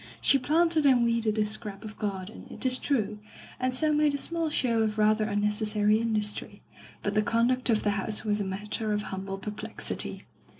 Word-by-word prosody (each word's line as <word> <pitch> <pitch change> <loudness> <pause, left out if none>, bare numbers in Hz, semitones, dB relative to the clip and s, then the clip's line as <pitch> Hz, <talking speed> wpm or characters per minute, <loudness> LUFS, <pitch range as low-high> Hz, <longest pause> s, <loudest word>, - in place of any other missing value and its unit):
She 275 - +4
planted 325 +3 +2
and 260 -4 +5
weeded 230 -2 +1
a 215 - +2
scrap 210 -1 -6
of 215 0 -8
garden, 195 0 -5
it - - -4
is 255 0 +1
true, 215 -7 -1 0.4
and 255 0 0
so 305 +4 +2
made 300 -1 +3
a - - -1
small 330 +2 -1
show 235 -6 +1
of 215 -1 0
rather 215 0 +3
un 205 0 0
necessary 210 0 +2
industry, 215 -2 -2 0.4
but 205 - -1
the 215 - +3
conduct 240 +4 +1
of 220 -2 +2
the 205 - +2
house 210 +2 0
was 210 -1 +1
a - - 0
matter 210 +3 -3
of 210 0 -1
humble 195 0 -4
perplexity. 210 +2 -2
215 Hz, 195 wpm, -28 LUFS, 210-255 Hz, 0.4 s, and